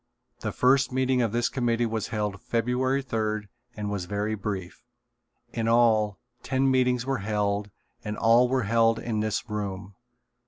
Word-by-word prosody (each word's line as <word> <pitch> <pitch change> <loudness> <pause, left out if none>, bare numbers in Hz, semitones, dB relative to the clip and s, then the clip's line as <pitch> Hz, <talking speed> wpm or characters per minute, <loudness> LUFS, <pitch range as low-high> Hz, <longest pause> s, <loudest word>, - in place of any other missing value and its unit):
The 110 - -3
first 135 +5 +3
meeting 130 0 +1
of 115 -3 +1
this 120 +1 +1
committee 120 -2 0
was 110 -2 -2
held 105 -2 -3
February 125 +4 0
third 110 -4 -2 0.3
and 105 -1 -3
was 100 -3 -3
very 105 +3 -2
brief. 100 -4 -5 0.7
In 115 -1 -1
all, 110 -3 +3 0.2
ten 135 0 +1
meetings 125 -2 +2
were 135 -2 -1
held 105 0 -1 0.3
and 105 0 -4
all 120 +2 +4
were 130 -1 +1
held 115 +1 +3
in 110 -2 -2
this 110 +2 -1
room. 100 -2 -5
115 Hz, 155 wpm, -26 LUFS, 105-125 Hz, 0.7 s, all